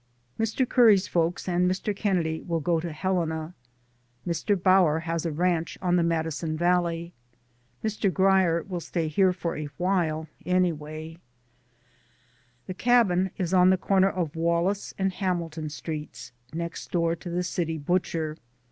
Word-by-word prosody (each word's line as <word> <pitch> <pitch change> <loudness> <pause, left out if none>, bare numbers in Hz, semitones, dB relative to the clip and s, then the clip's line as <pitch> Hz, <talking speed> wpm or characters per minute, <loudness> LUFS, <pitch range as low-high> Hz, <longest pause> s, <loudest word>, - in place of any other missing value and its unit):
Mr. 225 +3 0
Curry's 220 -7 +5
folks 170 +1 0
and 180 0 +2
Mr. 195 +3 -2
Kennedy's 175 -6 -1
will 165 -1 0
go 165 +2 +1
to 170 +1 -4
Helena. 160 -1 -2 0.7
Mr. 180 +3 0
Bower 180 -4 +4
has 165 0 -2
a - - -2
ranch 170 +1 0
on 180 -1 +1
the 175 - +3
Madison 160 -1 -1
Valley. 175 0 0 0.7
Mr. 215 -2 0
Grier 190 -3 +3
will 180 -2 -5
stay 165 0 -2
here 185 +5 +3
for 175 -2 -3
a 150 -1 -4
time, 165 -1 -1 0.2
anyway. 160 -3 -1
liMM 165 - -15 1.5
The 185 - -5
cabin 190 -5 +3
is 180 -1 -2
on 180 0 +6
the 190 - +4
corner 195 +1 +3
of 175 -5 -3
Wallace 170 +4 0
and 190 -1 0
Hamilton 170 -5 -2
Streets, 150 -4 -7 0.2
next 170 +1 -5
door 170 -1 +1
to 175 - -8
the 175 +1 -1
city 165 -2 -2
butcher. 160 -1 -1
175 Hz, 150 wpm, -26 LUFS, 160-185 Hz, 1.5 s, on